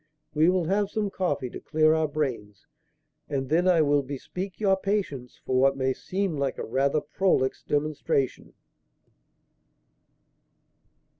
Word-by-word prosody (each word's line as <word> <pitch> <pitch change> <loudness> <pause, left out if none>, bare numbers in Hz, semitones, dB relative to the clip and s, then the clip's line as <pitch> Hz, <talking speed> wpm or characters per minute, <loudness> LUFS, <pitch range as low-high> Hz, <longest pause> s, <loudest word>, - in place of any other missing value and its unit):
We 155 +2 +4
will 185 -1 +2
have 200 +3 +1
some 210 -2 -2
coffee 145 -10 -2
to - - -7
clear 155 0 +3
our 160 -1 +1
brains, 125 -10 -4 0.6
and 135 -2 -2
then 170 +4 +2
I 170 -3 +5
will 145 -1 +3
bespeak 160 +8 -6
your 195 -3 +3
patience 190 -11 -3
for 130 0 +1
what 135 +1 +3
may 130 0 +1
seem 190 +1 -3
like 140 -2 -1
a - - -4
rather 140 +5 +1
prolix 150 -4 0
demonstration." 145 -3 -1
150 Hz, 135 wpm, -26 LUFS, 135-185 Hz, 0.6 s, I